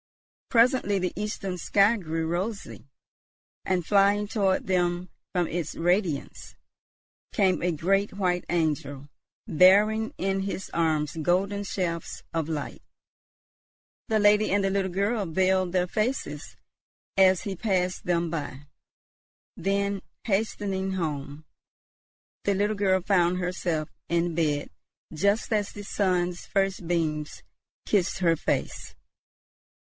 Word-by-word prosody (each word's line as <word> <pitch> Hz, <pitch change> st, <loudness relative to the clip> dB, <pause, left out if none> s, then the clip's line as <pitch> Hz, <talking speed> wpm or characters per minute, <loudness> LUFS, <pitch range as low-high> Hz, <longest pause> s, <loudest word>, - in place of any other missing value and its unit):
Presently 235 Hz, -4 st, +3 dB
the 180 Hz, -1 st, -2 dB
eastern 195 Hz, -3 st, -3 dB
sky 200 Hz, +6 st, +4 dB
grew 165 Hz, -5 st, -3 dB
rosy; 190 Hz, +3 st, -4 dB, 0.8 s
and 180 Hz, -3 st, 0 dB
flying 205 Hz, +1 st, +3 dB
toward 195 Hz, -3 st, +1 dB
them 175 Hz, -1 st, 0 dB, 0.2 s
from 175 Hz, -2 st, 0 dB
its 165 Hz, -2 st, -3 dB
radiance, 175 Hz, -3 st, -1 dB, 0.8 s
came 190 Hz, -4 st, +2 dB
a 180 Hz, -, +1 dB
great 195 Hz, +6 st, +1 dB
white 180 Hz, -2 st, 0 dB
angel 150 Hz, -4 st, -1 dB, 0.4 s
bearing 210 Hz, +6 st, +4 dB
in 195 Hz, +1 st, 0 dB
his 195 Hz, -1 st, -4 dB
arms 155 Hz, -2 st, 0 dB
golden 195 Hz, +5 st, +1 dB
shafts 175 Hz, -4 st, -3 dB
of 165 Hz, -1 st, -1 dB
light. 150 Hz, -3 st, -4 dB, 1.3 s
The 220 Hz, -, +3 dB
lady 210 Hz, +1 st, +4 dB
and 200 Hz, 0 st, +2 dB
the 195 Hz, -, +1 dB
little 190 Hz, -1 st, 0 dB
girl 200 Hz, +3 st, 0 dB
veiled 185 Hz, +2 st, +1 dB
their 180 Hz, 0 st, +1 dB
faces 215 Hz, -, -3 dB, 0.6 s
as 190 Hz, -2 st, +5 dB
he 195 Hz, -2 st, -4 dB
passed 185 Hz, -2 st, -1 dB
them 170 Hz, -1 st, +1 dB
by. 145 Hz, -3 st, -5 dB, 0.9 s
Then, 200 Hz, 0 st, -1 dB, 0.2 s
hastening 195 Hz, -2 st, -1 dB
home, 150 Hz, -4 st, -4 dB, 1.0 s
the 200 Hz, -, +1 dB
little 205 Hz, +2 st, +1 dB
girl 190 Hz, -2 st, +2 dB
found 180 Hz, -2 st, +2 dB
herself 180 Hz, -4 st, -2 dB, 0.2 s
in 170 Hz, 0 st, +1 dB
bed 150 Hz, -3 st, 0 dB, 0.4 s
just 200 Hz, +7 st, +1 dB
as 205 Hz, -2 st, 0 dB
the 205 Hz, -, -8 dB
sun's 180 Hz, -3 st, 0 dB
first 195 Hz, -3 st, 0 dB
beams 155 Hz, -3 st, -2 dB, 0.4 s
kissed 190 Hz, -3 st, +1 dB
her 170 Hz, -3 st, +3 dB
face. -, -, -3 dB
185 Hz, 120 wpm, -26 LUFS, 170-200 Hz, 1.3 s, as